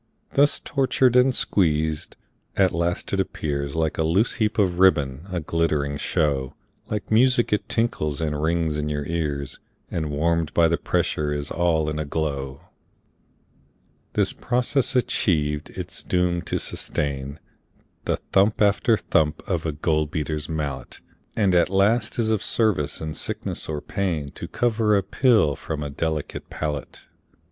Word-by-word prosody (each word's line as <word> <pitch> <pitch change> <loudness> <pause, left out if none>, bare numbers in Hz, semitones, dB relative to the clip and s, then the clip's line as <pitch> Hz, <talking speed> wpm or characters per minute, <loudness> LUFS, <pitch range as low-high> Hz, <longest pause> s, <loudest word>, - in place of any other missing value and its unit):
Thus 145 +1 +4
tortured 130 -2 +2
and 125 +1 +6
squeezed, 80 -4 0 0.4
at 95 -2 +4
last 85 +3 -2
it 100 - +1
appears 70 -6 -2
Like 80 -1 -1
a - - +3
loose 90 +9 +2
heap 110 0 +1
of 90 -4 +1
ribbon, 75 -4 +3
a 90 - -1
glittering 75 -3 0
show, 70 -2 0 0.3
Like 105 -1 -4
music 120 0 +4
it 105 - -1
tinkles 75 -11 0
and 75 -2 -2
rings 80 -1 0
in 75 0 -2
your 75 -1 -2
ears, 75 -4 -3 0.3
And 80 -2 -2
warm'd 80 +2 0
by 85 -1 +5
the 85 +1 +1
pressure 75 -1 0
is 75 0 -3
all 80 -3 +1
in 75 0 -2
a 75 - -2
glow. 70 -3 -3 1.5
This - - +1
process 125 +2 0
achiev'd, 75 -11 +1
it - - -7
is - - -1
doom'd 90 -1 0
to - - 0
sustain 70 +1 -3 0.7
The - - 0
thump 100 +2 +3
after 105 +2 +3
thump 75 -4 0
of 85 -3 -1
a - - 0
gold 75 0 0
beater's 75 0 -3
mallet, 75 -3 -4 0.4
And 100 -4 +2
at 85 0 +4
last 105 +4 +2
is 110 -2 +1
of 110 -3 +1
service 90 -11 +1
in 80 -1 -4
sickness - - -3
or 75 -2 -3
pain 80 -8 -2
To - - -7
cover 110 -3 +2
a 100 - 0
pill 105 - +3
from 75 +1 -5
a 70 - -5
delicate 80 +1 -3
palate. 75 -3 -5
80 Hz, 155 wpm, -24 LUFS, 75-100 Hz, 1.5 s, and